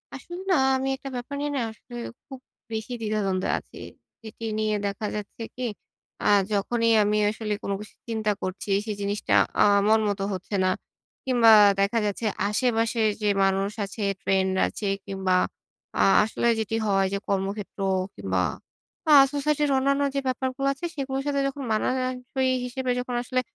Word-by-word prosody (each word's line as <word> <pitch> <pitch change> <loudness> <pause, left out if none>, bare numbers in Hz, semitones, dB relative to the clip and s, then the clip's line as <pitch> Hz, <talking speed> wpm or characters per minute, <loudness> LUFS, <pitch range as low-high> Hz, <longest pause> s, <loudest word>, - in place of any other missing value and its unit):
আসলে 345 - -8
না - - +5 0.2
আমি 265 +1 -2
একটা 275 +1 -8
ব্যাপার 245 +3 -5
নিয়ে 290 0 -2
না - - 0
আসলে 240 +2 -13 0.3
খুব 265 -2 -9 0.3
বেশি 220 +3 -4
দ্বিধাদ্বন্দ্বে 205 -4 -1
আছি। - - -16 0.5
এটি 220 +1 -8
নিয়ে 215 -1 +1
দেখা 200 +2 -4
যাচ্ছে 210 +2 -6
কি, 255 - -5 0.6
আ - - +1 0.2
যখনই 230 +3 +1
আমি 210 +1 +1
আসলে 215 0 -3
কোন - - -3
কিছু 210 - -12
চিন্তা 220 -2 0
করছি, 185 +2 -5 0.2
সেই 215 - -3
জিনিসটা 205 +1 -1 0.3
আ - - +8 0.2
মনমতো 210 -2 +2
হচ্ছে 190 +2 -5
না 185 - +3 0.6
কিংবা 245 -3 +5 0.3
দেখা 200 +4 +2
যাচ্ছে 205 +2 -2 0.2
আশেপাশে 225 +1 +1 0.2
যে 210 - +1 0.2
মানুষ 195 +1 +1
আছে, 200 +2 -6 0.2
ট্রেন্ড 190 -1 +1
আছে 210 - -4 0.2
কিংবা 190 -2 -1 0.6
আ - - +3 0.2
আসলে 225 +2 -1
যেটি 220 0 -2
হয় 195 -1 +3
যে - - +1
কর্মক্ষেত্র 200 +1 -3 0.4
কিংবা 95 -2 -1 0.7
আ - - +6 0.2
সোসাইটির 295 0 +1
অন্যান্য 275 +1 +2
যে - - +2
ব্যাপারগুলা 260 +1 -1
আছে, 275 +6 -7
সেগুলার 270 -1 -3
সাথে 280 -1 +1
যখন 275 0 -5
মানানসই 255 +3 0 0.2
হিসেবে 255 +1 -2
যখন 250 0 -4
আসলে 255 +1 -1
220 Hz, 155 wpm, -25 LUFS, 200-260 Hz, 0.7 s, আ